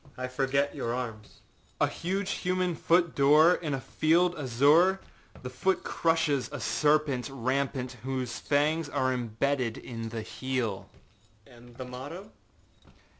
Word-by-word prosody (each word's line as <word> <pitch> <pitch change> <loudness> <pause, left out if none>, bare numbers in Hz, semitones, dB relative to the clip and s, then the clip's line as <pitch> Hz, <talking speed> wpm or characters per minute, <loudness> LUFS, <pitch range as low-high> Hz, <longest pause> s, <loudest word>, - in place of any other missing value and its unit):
â 130 - -5
âI 130 - -7
forget 140 +2 0
your 115 +1 -3
arms.â 110 -4 -5
âA - - -4
huge 195 +3 -2
human 180 -1 -1
foot 170 +1 +2
dâor, 150 +6 +5
in 150 -5 -1
a - - -4
field 170 +6 +2
azure; 150 +8 +4 0.4
the 125 - -5
foot 190 +9 0
crushes 160 -5 0
a - - -5
serpent 145 -4 +1
rampant 130 0 -2
whose 130 -2 -3
fangs 150 +2 +1
are 130 -2 0
imbedded 125 +1 -1
in 115 -2 -6
the 110 -1 -5
heel.â 115 -2 -6
âAnd 120 0 -16
the 130 - -6
motto? 145 +11 -8
135 Hz, 135 wpm, -28 LUFS, 125-160 Hz, 0.4 s, dâor